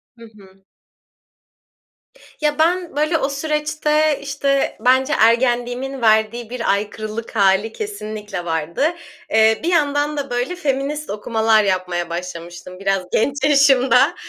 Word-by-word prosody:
Hı 230 - -15
hı. 195 -1 -19 1.8
Ya, 300 0 0
ben 345 -1 +1
böyle 305 +2 +1
o 275 - -1
süreçte, 300 0 0
işte, 275 -1 -1
bence 260 +3 +3
ergenliğimin 245 +3 +1
verdiği 220 +1 +2
bir 245 -4 -1
aykırılık 215 +3 -4
hâli 200 +2 +3
kesinlikle 215 - -6
vardı. 165 - -1 0.4
Eee, 220 0 +4
bir - - -2
yandan 295 -2 +1
da 275 -2 -3
böyle 245 +9 -2
feminist 295 -1 -2
okumalar 220 +1 +1
yapmaya 180 -3 -1
başlamıştım 175 +1 -7
biraz 195 -1 0
genç 275 +5 0
yaşımda. 275 0 +4
245 Hz, 120 wpm, -19 LUFS, 210-290 Hz, 1.8 s, Eee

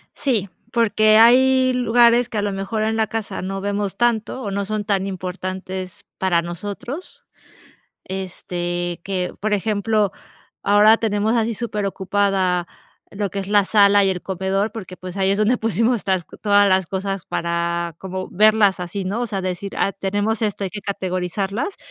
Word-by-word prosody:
Sí, 225 -8 0 0.2
porque 215 -2 +4
hay 255 +3 +5
lugares 240 -1 +4
que 220 - -4
a - - +1
lo 205 0 -1
mejor 195 +3 -2
en 220 +1 0
la 220 -1 +1
casa 225 0 -4
no 195 +1 -4
vemos 200 -1 -2
tanto 240 +1 0
o 205 -5 -4
no 200 0 -2
son 215 +1 -2
tan 195 -1 0
importantes 185 0 -6
para 180 -3 +2
nosotros, 205 - -7 0.8
este, 175 -2 -4
que, 185 -2 -2
por 215 +1 -1
ejemplo, 210 0 +1 0.5
ahora 210 +2 +6
tenemos 215 0 0
así 230 0 0
superocupada 195 -4 0 0.4
lo 200 -1 -3
que 200 - -5
es 195 -1 -4
la 205 -1 +4
sala 200 0 +5
y 195 - +2
el 180 -2 -3
comedor, 190 +3 -1
porque, 190 -5 -8
pues, 185 +1 -8
ahí 190 -1 +2
es 200 - +1
donde 215 +4 +3
pusimos 225 +2 +1
las 190 -3 +1 0.2
todas 205 -1 +5
las 190 -1 +2
cosas 195 0 -3
para 170 0 -2
como 185 0 -5
verlas 210 -1 +4
así, 180 +2 -4
¿no? 200 +5 -2
O 245 - -1
sea, 200 -2 -2
decir: 185 +1 -4
"Ah, 195 - +1
tenemos 205 +3 -1
esto, 205 -2 -1
hay 190 - -3
que 205 - -6
categorizarlas". 195 - -3
200 Hz, 165 wpm, -21 LUFS, 190-215 Hz, 0.8 s, ahora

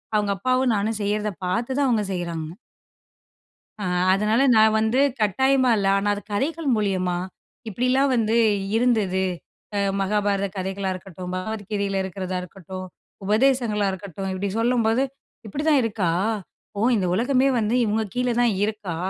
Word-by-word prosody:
அவுங்க 205 -1 +1
அப்பாவும் 255 +3 +1
நானும் 215 +2 -1
செய்யறதை 210 +1 -1
பாத்து 230 +8 -1
தான் 280 -2 +2
அவுங்க 225 -4 +2
செய்யுறாங்க. 165 -3 -4 1.3
ஆ, - - -2 0.3
அதனால 210 +5 +1 0.2
நான் 220 0 +5
வந்து, 220 +4 +2 0.2
கட்டாயமா 260 +5 +3
இல்லை. 195 -1 +1
ஆனா 205 +1 -1
அது 205 - -7
கதைகள் 300 +7 -1
மூலியமா, 185 -4 0 0.5
இப்படிலாம் 255 +5 +1
வந்து 225 0 +1 0.4
இருந்தது. 210 -6 +2 0.5
அ - - +1 0.2
மகாபாரத 200 0 +1
கதைகளா 190 +1 -2
இருக்கட்டும், 180 0 -8
பகவத்கீதையில 200 0 -2
இருக்கிறதா 185 -1 -4
இருக்கட்டும், 185 +1 -8 0.4
உபதேசங்களா 220 -1 +2
இருக்கட்டும், 195 0 -6
இப்டி 200 +2 -2
சொல்லும்போது, 230 +1 +2 0.4
இப்படிதான் 295 +5 +2
இருக்கா? 210 -6 0 0.7
ஓ! - - -1 0.2
இந்த 185 -3 0
உலகமே 255 +5 +2
வந்து, 220 +2 0
இவுங்க 220 +1 0
கீழே 250 -1 0
தான் 240 -3 +3
இருக்கா? 210 -6 -4
210 Hz, 130 wpm, -23 LUFS, 195-240 Hz, 1.3 s, நான்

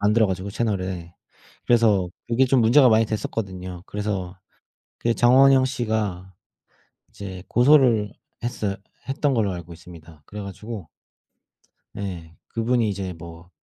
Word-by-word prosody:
만들어 105 +2 +3
가지고 95 +1 -3
채널에. 95 -6 -3 0.5
그래서 110 -6 +3 0.2
그게 125 +3 +2
좀 130 -1 +3
문제가 125 +4 +6
많이 115 0 +4
됐었거든요. 95 -4 -5
그래서 100 -3 -4 0.6
그 115 0 0
장원영 130 +2 +6
씨가 110 -8 -2 0.7
이제 95 -2 -8
고소를 120 -5 +4 0.3
했어 105 -4 -2 0.3
했던 140 +1 0
걸로 105 -5 +1
알고 85 -1 -8
있습니다. 80 -2 -14
그래 105 0 -7
가지고 100 -1 -8 1.1
예 90 -5 -6 0.2
그분이 115 -1 +1
이제 95 -2 -4
뭐 85 +1 -12
105 Hz, 275 characters per minute, -23 LUFS, 90-115 Hz, 1.1 s, 문제가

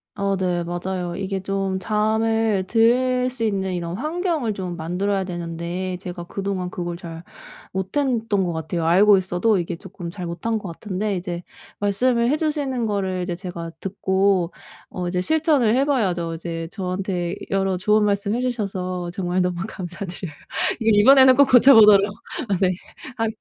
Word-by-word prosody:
어 200 -1 0
네. 180 -2 -1
맞아요. 175 0 -3
이게 195 0 -3
좀 195 -1 -2
잠을 220 -1 +1
들 250 +2 +3
수 245 -2 -4
있는 190 -3 -1
이런 170 0 -3
환경을 310 - -1
좀 180 -3 -5
만들어야 190 +4 -1
되는데 175 +1 -4
제가 175 -2 -6
그동안 190 0 -3
그걸 175 -1 -4
잘 165 -1 -9 0.5
못했던 220 0 0
거 175 - -1
같아요. 160 +1 -3
알고 195 +4 +6
있어도 190 +3 +1
이게 170 - -3
조금 175 -1 -9
잘 180 0 -6
못한 195 +7 -2
거 200 -4 -6
같은데 200 +3 -3
이제 175 -1 -5 0.4
말씀을 235 +4 +2
해 300 - +2
주시는 285 -6 -1
거를 190 -3 -1
이제 175 -1 -3
제가 175 -2 -6
듣고 190 -2 +1 0.4
어 180 -1 -4
이제 180 0 -1
실천을 295 - +2
해 270 - +3
봐야죠. 180 - 0
이제 165 0 -5
저한테 185 -2 -3 0.2
여러 195 -1 +1
좋은 210 +3 +3
말씀해 200 +3 0
주셔서 185 -7 -3
정말 180 0 -1
너무 180 -1 -1
감사드려요. 180 -1 -6 0.5
이 220 -2 +4
이번에는 260 +1 +7
꼭 280 -1 +5
고쳐보도록 210 -6 +7 0.3
아 195 - +2
네. 185 - +4 0.5
하 225 0 +1
195 Hz, 315 characters per minute, -22 LUFS, 180-225 Hz, 0.5 s, 이번에는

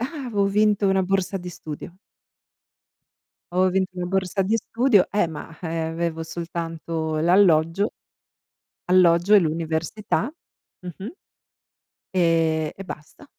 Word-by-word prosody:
Ah, 275 +3 -4
avevo 205 -4 0
vinto 205 0 +2
una 190 0 +2
borsa 195 +1 -1
di 180 0 -7
studio. 165 0 -8 1.6
Avevo 185 +1 +3
vinto 190 0 0
una 180 0 -3
borsa 190 +1 0
di 210 +4 +1
studio, 230 -2 +2
eh, 205 -3 +2
ma 160 -2 -8
avevo 165 0 -3
soltanto 165 -1 -4
l'alloggio, 170 +2 +3 0.9
alloggio 180 +1 +4
e 210 - +9
l'università, 165 - -1 0.5
mh-mh, 180 +3 -8 1.0
e 165 -4 +1
e 195 - -8
basta. 155 - -10
180 Hz, 110 wpm, -23 LUFS, 165-195 Hz, 1.6 s, e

